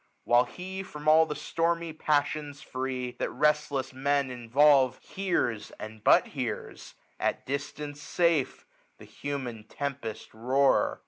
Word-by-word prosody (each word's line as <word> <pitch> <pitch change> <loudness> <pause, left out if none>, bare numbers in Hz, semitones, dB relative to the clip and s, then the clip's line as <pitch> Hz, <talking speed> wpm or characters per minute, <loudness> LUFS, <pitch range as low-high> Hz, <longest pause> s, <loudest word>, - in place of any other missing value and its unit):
While 120 +1 +4
he, 185 +9 -6
from 150 -5 -9
all 160 +1 +6
the 150 - -3
stormy 165 +2 -1
ps^ssions 150 -1 -1
free 130 -1 -3
That - - -1
restless 150 -3 +1
Men 140 0 +1
involve, 130 +2 +4
hears, 175 - -2
and 110 0 -9
but - - +5
hears» - - -5 0.2
At - - -1
distance 145 +1 -5
safe, 165 -2 +1 0.3
the - - -13
human 130 -6 -5
tempest 140 -5 -5
roar. 130 +5 +2
140 Hz, 125 wpm, -28 LUFS, 130-150 Hz, 0.3 s, all